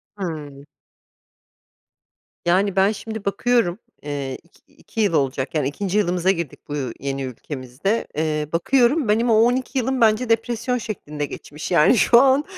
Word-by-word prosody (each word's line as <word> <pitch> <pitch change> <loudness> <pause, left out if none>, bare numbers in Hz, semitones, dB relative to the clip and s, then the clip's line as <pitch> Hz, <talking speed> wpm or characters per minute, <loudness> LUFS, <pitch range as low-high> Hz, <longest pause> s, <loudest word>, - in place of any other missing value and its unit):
Hıı. 150 -7 -6 1.8
Yani, 190 +3 +2
ben 195 +2 +4
şimdi 220 0 -7
bakıyorum, 230 -2 +1 0.2
eee, 140 -2 -4
iki 170 - -28
iki 225 - -5
yıl 200 -5 +2
olacak 135 0 -1
yani 145 -3 +1
2. 195 +7 -2
yılımıza 180 -1 +2
girdik 170 -6 -4
bu - - -4
u 130 -5 -3
yeni 135 0 -3
ülkemizde. 130 - -3
Eee, 150 -1 -1
bakıyorum 255 - +2
benim 230 +3 +2
o - - +5
12 245 +4 +2
yılım 260 0 0
bence 225 +2 +3
depresyon 230 +2 0
şeklinde 150 -10 -5
geçmiş. 150 +4 -8
Yani 175 +8 +5
şu 235 +3 +6
an 275 +2 +4
190 Hz, 150 wpm, -22 LUFS, 150-230 Hz, 1.8 s, şu